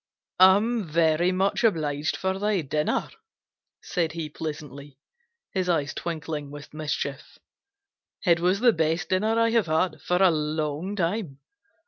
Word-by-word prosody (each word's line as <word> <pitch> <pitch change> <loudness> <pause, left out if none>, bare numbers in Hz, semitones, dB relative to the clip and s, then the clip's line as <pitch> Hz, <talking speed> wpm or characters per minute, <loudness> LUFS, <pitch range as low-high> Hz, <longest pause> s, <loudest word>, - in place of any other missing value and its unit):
"I'm 205 +5 +5
very 165 +2 +2
much 190 +5 0
obliged 155 -6 0
for 190 0 -2
that 200 -8 -1
dinner," 150 +1 0 0.7
said 165 -4 -1
he 165 -2 -4
pleasantly, 145 -3 -7 0.5
his 185 -2 -1
eyes 145 -4 0
twinkling 155 -3 -4
with 145 0 -11
mischief. 150 -2 -4 0.9
"It 170 -2 +4
was 185 +4 +1
the 240 -2 +5
best 160 +2 0
dinner 215 +5 +1
I 230 0 +3
have 230 -5 +2
had 155 0 0
for 180 - 0
a 185 - +6
long 155 +4 -2
time. 175 -5 -2
165 Hz, 135 wpm, -26 LUFS, 150-190 Hz, 0.9 s, a